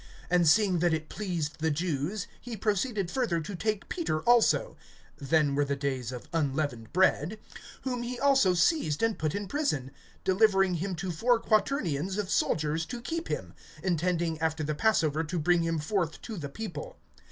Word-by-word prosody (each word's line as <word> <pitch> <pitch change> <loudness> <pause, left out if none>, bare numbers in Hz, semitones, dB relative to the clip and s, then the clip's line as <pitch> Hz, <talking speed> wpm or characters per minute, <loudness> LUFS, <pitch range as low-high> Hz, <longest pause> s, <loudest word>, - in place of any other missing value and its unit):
(3)And 175 -2 +4
seeing 190 +1 +4
that 170 -1 +3
it 155 0 -6
pleased 175 -7 -3
the 160 +1 +1
Jews, 165 +5 -2 0.2
he 240 -2 -6
proceeded 205 -2 0
further 230 -11 0
to 170 +5 -6
take 215 +2 -2
Peter 310 - -2
also; 240 - +3 0.4
(then 145 0 +2
were 145 +1 +2
the 140 0 -1
days 135 -4 -2
of 125 -1 -8
unleavened 140 -7 -1
bread;) 185 +1 +2 0.5
(4)whom 250 -2 -2
he 245 +1 -4
also 270 -10 +4
seized 170 - +2
and 225 -2 +1
put 155 +1 -1
in 200 0 -3
prison, 150 - -1 0.3
delivering 195 -1 +3
him 180 +2 -2
to 180 +2 -3
four 235 +9 +3
quaternions 195 - 0
of 205 -2 -2
soldiers 155 +1 +1
to 245 - -5
keep 330 +7 -4
him; - - -4 0.3
intending 170 -2 0
after 160 -1 0
the 155 +1 -1
passover 160 -4 +2
to 165 +3 -3
bring 175 +2 +3
him 165 0 0
forth 165 +1 -1
to 225 - -6
the 150 -7 -5
people. 225 - -7
175 Hz, 175 wpm, -29 LUFS, 155-215 Hz, 0.5 s, 3)And